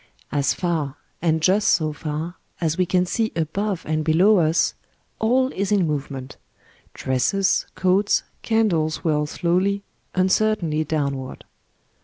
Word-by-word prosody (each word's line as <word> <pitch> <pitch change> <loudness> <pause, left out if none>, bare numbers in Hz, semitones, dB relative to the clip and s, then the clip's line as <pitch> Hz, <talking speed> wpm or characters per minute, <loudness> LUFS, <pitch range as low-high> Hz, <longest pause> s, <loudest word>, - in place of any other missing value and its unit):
As 145 -1 +1
far, 155 -6 -2 0.2
and 160 -1 +1
just 195 +4 +3
so 155 -2 +2
far, 155 +3 -4 0.3
as 160 -2 0
we 185 0 +1
can 180 0 +2
see 220 +4 -1
above 180 +4 -2
and 155 0 0
below 180 +6 +4
us, 160 0 +2 0.5
all 255 +4 +2
is 200 +1 -2
in 200 -4 +3
movement; 140 -3 -4 0.6
dresses, 190 +10 +1
coats, 190 +2 +2 0.2
candles 175 -9 +1
whirl 150 -2 +1
slowly, 185 +5 0 0.3
un 185 0 +3
certainly 185 -8 +1
downward. 140 -4 -3
170 Hz, 130 wpm, -22 LUFS, 155-195 Hz, 0.6 s, below